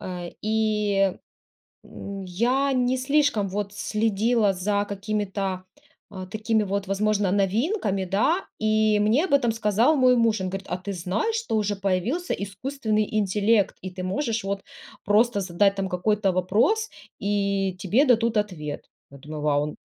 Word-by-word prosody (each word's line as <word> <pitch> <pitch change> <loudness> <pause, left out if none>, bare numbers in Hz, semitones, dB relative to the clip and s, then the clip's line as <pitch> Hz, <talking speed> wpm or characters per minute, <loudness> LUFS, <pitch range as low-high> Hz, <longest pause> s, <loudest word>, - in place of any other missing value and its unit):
Э, 180 -2 -6
и, 210 -3 +1 0.7
м, 200 -1 -8
я 245 +10 +1
не 250 0 +1
слишком, 275 -6 +1
вот, 200 +1 -3
следила 215 +1 +1
за 200 +2 0
какими-то, 200 -2 -3 0.5
э, 185 -2 -7
такими, 220 +1 0
вот, 200 0 -2
возможно 205 0 +1
новинками, 200 - 0
да. 215 - +1
И 215 -1 +2
мне 225 - +3
об 360 - +1
этом 245 -4 +3
сказал 225 +6 +2
мой 255 -2 +5
муж. 225 -3 +2
Он 185 - -2
говорит: 195 +1 -6
"А - - 0
ты 200 +2 -5
знаешь, 185 - -2
что 460 - -2
уже 210 -1 0
появился 200 - -1
искусственный 215 +2 -2
интеллект 205 +1 +2
и 190 - -5
ты 185 0 -7
можешь, 225 +3 -2
вот, 195 0 -3 0.4
просто 210 +2 +3
задать 195 +2 +2
там 195 -1 -2
какой-то 195 +2 +1
вопрос, 220 - +1 0.3
и 200 -2 0
тебе 220 +9 +3
дадут 230 -2 +3
ответ. 175 -9 -3 0.3
Я 140 - -13
думаю: 150 +2 -7
"Вау", 145 -1 +2
он 150 0 -5
205 Hz, 150 wpm, -25 LUFS, 195-225 Hz, 0.7 s, мой